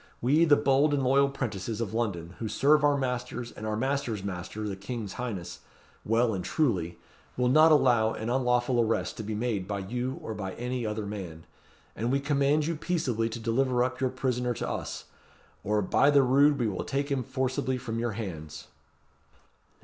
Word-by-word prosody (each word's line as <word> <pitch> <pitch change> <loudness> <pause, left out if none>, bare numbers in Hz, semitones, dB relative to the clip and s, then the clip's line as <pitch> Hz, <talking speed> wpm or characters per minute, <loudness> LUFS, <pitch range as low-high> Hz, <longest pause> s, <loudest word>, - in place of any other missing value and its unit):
We, 150 +7 +4
the 150 -3 +6
bold 140 +2 +3
and 135 - 0
loyal 140 +2 +4
'prentices 110 -5 -4
of 110 -3 -3
London, 95 -7 -2
who 115 - -3
serve 145 +7 +3
our 145 -1 +4
masters 125 -2 -3
and 110 - -7
our 110 - -1
masters' 130 -5 -1
master, 100 +2 -5
the 100 - -3
king's 100 +1 -6
highness, 95 -9 -5 0.4
well 115 +1 +2
and 95 -2 -3
truly, 90 - 0 0.4
will 125 0 +2
not 155 +4 +6
allow 120 -7 +4
an 110 - -5
unlawful 125 0 +1
arrest 115 0 0
to 110 - -4
be 110 +1 -4
made 105 -4 -2
by 100 0 -2
you 120 +7 -3
or 110 - -4
by 95 -3 -5
any 125 -1 -3
other 105 0 -3
man. 90 -6 -7 0.5
And 115 +4 -1
we 135 - +2
command 145 +1 +2
you 165 +1 -1
peaceably 130 -9 -1
to 115 - -6
deliver 120 +2 +1
up 130 +1 -3
your 130 - +2
prisoner 125 -1 -1
to - - -3
us; - - -5 0.6
or, 105 0 +1
by 140 +9 +3
the 140 -2 +5
rood! 140 +3 +4
we 120 -4 0
will 100 - -3
take 140 +1 -2
him 135 -2 +1
forcibly 130 +1 -1
from 115 -3 -4
your 120 -1 -1
hands!" 80 -9 -7
120 Hz, 190 wpm, -28 LUFS, 105-135 Hz, 0.6 s, the